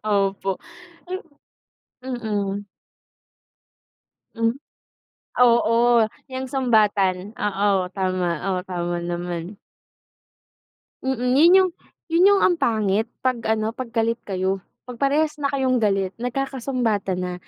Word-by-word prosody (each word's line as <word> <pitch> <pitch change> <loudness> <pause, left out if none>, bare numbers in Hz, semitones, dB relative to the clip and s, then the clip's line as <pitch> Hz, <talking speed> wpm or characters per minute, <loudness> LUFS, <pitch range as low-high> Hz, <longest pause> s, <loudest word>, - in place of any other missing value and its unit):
Opo. 195 -2 0 0.5
Hmm. 345 -5 -8 0.8
Mm. 205 -3 -2 1.7
Hmm. 230 +1 0 0.8
Oo, 235 -1 +4 0.2
'yang 260 0 -5
sumbatan. 210 -6 +2
Oo, 200 -2 +1
tama. 185 -2 -1 0.3
O - - -2
tama 175 -2 -3
naman. 175 +2 -4 1.5
Mm, 250 -1 0
yun 330 +6 +6
yung 375 -1 +3 0.4
yun 345 +3 +5
yung 400 - +4
ang 360 - +3
pangit 220 -6 +1 0.2
'pag 250 -3 0
ano, 220 +1 0
'pag 255 -2 -6
galit 230 +1 0
kayo. 190 0 -2 0.2
'Pag 250 +1 -9
parehas 300 +3 +2
na 280 - +1
kayong 260 -3 +1
galit, 195 -2 +1
nagkakasumbatan 245 -6 -2
na. 180 0 -3
225 Hz, 105 wpm, -23 LUFS, 195-255 Hz, 1.7 s, yun